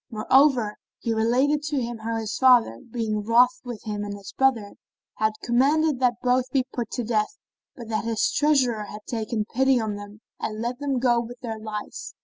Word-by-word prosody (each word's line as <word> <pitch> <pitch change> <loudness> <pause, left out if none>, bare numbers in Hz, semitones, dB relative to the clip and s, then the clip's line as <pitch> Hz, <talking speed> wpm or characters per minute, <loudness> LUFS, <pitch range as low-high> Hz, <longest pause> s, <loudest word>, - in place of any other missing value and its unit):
Moreover, 240 -1 +3 0.2
he 230 - -2
related 255 +7 +2
to 295 -2 -1
him 235 -2 -4
how 225 +1 -3
his 220 -1 -3
father, 245 - +4
being 220 -2 -2
wroth 240 +4 +4
with 240 -3 -7
him 210 -2 -4
and 205 0 -5
his 195 -2 -11
brother, 240 -7 +1 0.5
had 220 0 +1
commended 280 +4 +2
that 250 -2 +2
both 250 0 +2
be 260 -2 +1
put 235 -3 -3
to 245 - -2
death, 220 - -1 0.4
but 235 -3 -9
that 215 -1 -1
his 225 -2 +1
treasurer 260 -8 +2
had 210 +1 -9
taken 220 -2 -2
pity 265 +2 +2
on 215 -2 -3
them 205 +1 -11 0.2
and 215 0 -4
let 240 +3 -3
them 280 -2 -1
go 240 -1 +3
with 240 +1 -7
their 225 -3 -5
lives. 215 -1 -6
235 Hz, 190 wpm, -25 LUFS, 215-255 Hz, 0.5 s, father